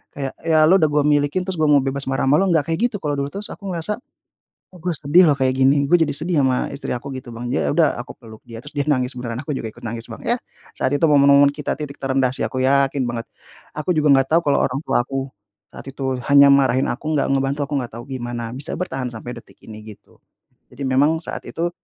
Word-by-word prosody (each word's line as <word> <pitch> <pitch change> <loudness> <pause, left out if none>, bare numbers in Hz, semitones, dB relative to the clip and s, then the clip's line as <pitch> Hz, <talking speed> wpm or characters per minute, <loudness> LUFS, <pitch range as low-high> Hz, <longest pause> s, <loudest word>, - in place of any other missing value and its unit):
kayak 135 -2 -4
ya 160 -1 +3
lu 180 +5 +5
udah 155 - +4
gue 150 0 +1
miliki, 145 +4 +1
terus 180 -3 -5
gue 155 - +3
mau 145 -2 +4
bebas 135 0 -3
marah 135 0 -1
sama 140 +3 +4
lu 195 - +2
enggak 160 -4 +2
kayak 160 - -1
gitu 230 - -10
kalau 145 -2 -1
dulu. 140 - -1
Terus 205 +1 -5
aku 200 - -9
ngerasa, 210 +7 -3 0.7
kok 180 - -13
gue 180 0 -1
sedih 150 +6 +4
loh 145 - +3
kayak 130 -1 +1
gini, 140 +2 +4
gue 175 +5 +4
jadi 155 - +2
sedih 160 +2 -1
sama 130 -2 +1
istri 140 - -6
aku 140 +3 -8
gitu, 130 -2 -8
Bang, 120 +1 -6
ya - - 0
udah 160 -4 +3
aku 120 - -9
peluk 110 -3 -14
dia, 115 -1 -9
terus - - -12
dia 145 - -1
nangis 130 -2 0
beneran, 120 -2 -5
aku 150 - -4
juga 115 -4 -4
ikut - - -17
nangis, 115 +1 -6
Bang, - - -9
yah, 240 +1 +1 0.3
saat - - -1
itu 165 - +2
momen-momen 140 -1 +5
kita 150 0 -4
titik 145 -2 -8
terendah 130 -1 +1
sih, - - -4
aku 110 +3 -2
yakin 135 0 +2
banget. 120 -1 -4 0.5
Aku 155 +4 0
juga 150 -2 +2
nggak 135 +3 0
tahu 170 - +5
kalau - - +3
orang 135 +2 -3
tuaku 135 -1 -1 0.4
saat - - -12
itu 135 -1 -3
hanya 140 0 +7
marahin 135 -1 +3
aku 130 - -5
nggak 145 - +1
ngebantu, 135 +1 0
aku - - -4
nggak 120 - -7
tahu 120 - -8
gimana 120 -3 -5
bisa 135 +3 -5
bertahan 135 -8 -3
sampai 115 +2 -7
detik - - -15
ini, 110 0 -11
gitu. - - -26 0.6
Jadi 140 +2 -7
memang 145 +5 +2
saat - - -6
itu 170 +1 -2
140 Hz, 240 wpm, -21 LUFS, 130-155 Hz, 0.7 s, hanya